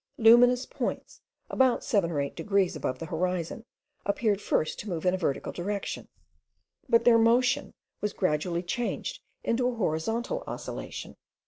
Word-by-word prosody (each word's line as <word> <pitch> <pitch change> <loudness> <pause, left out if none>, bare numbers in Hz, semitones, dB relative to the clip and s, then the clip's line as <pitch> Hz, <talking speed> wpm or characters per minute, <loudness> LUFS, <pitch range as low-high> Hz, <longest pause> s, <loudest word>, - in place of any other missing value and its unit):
Luminous 245 +2 +6
points, - - -4 0.3
about 260 -2 +2
seven 195 -6 +1
or 155 -4 -1
eight 140 0 -2
degrees 195 -4 +1
above 135 -3 -2
the 165 - -6
horizon, 180 +6 -2 0.4
appeared 205 0 +1
first 155 - 0
to 210 - -6
move 170 -1 -3
in 180 - +4
a - - +1
vertical 155 -7 -1
direction; 200 +3 -4 0.8
but 230 - +5
their 235 -1 +6
motion 245 +4 +3 0.3
was 210 - 0
gradually 170 0 0
changed 235 +7 -3 0.2
into 245 +2 +1
a 250 - -1
horizontal 225 - -1
oscillation. - - -6
205 Hz, 145 wpm, -28 LUFS, 175-235 Hz, 0.8 s, Luminous